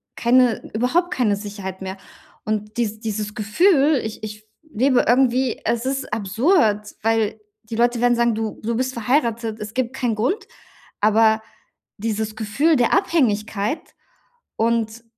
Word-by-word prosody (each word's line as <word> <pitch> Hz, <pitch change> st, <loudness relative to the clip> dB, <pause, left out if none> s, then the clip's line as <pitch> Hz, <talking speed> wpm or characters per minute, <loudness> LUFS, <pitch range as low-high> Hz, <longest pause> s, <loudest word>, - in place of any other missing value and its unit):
keine 245 Hz, -1 st, +3 dB
überhaupt 290 Hz, +11 st, +1 dB
keine 220 Hz, -5 st, +1 dB
Sicherheit 200 Hz, -2 st, -7 dB
mehr 190 Hz, 0 st, -5 dB, 0.5 s
und 215 Hz, 0 st, -3 dB
dies 220 Hz, -2 st, -1 dB
dieses 210 Hz, -1 st, -4 dB
Gefühl 285 Hz, -, +3 dB
ich 220 Hz, 0 st, -6 dB
ich 210 Hz, 0 st, -6 dB
f -, -, -27 dB, 0.3 s
lebe 255 Hz, +2 st, +3 dB
irgendwie 255 Hz, 0 st, +2 dB
es 235 Hz, +1 st, 0 dB
ist 270 Hz, 0 st, -3 dB
absurd, 215 Hz, -, +1 dB
weil 220 Hz, -1 st, +1 dB, 0.2 s
die 220 Hz, +1 st, -7 dB
Leute 240 Hz, 0 st, +2 dB
werden 245 Hz, 0 st, +4 dB
sagen: 235 Hz, -1 st, +2 dB
„Du 220 Hz, -1 st, -4 dB
du 230 Hz, +2 st, -1 dB
bist 260 Hz, +2 st, -1 dB
verheiratet, 235 Hz, -2 st, 0 dB
es 210 Hz, 0 st, -7 dB
gibt 255 Hz, 0 st, -1 dB
keinen 245 Hz, -4 st, -1 dB
Grund“, 255 Hz, -, -1 dB, 0.5 s
aber 220 Hz, +1 st, +4 dB, 0.6 s
dieses 220 Hz, 0 st, -2 dB
Gefühl 245 Hz, +10 st, +1 dB
der 245 Hz, -3 st, +2 dB
Abhängigkeit 225 Hz, -, 0 dB, 0.6 s
und 230 Hz, 0 st, 0 dB
225 Hz, 140 wpm, -21 LUFS, 215-255 Hz, 0.6 s, werden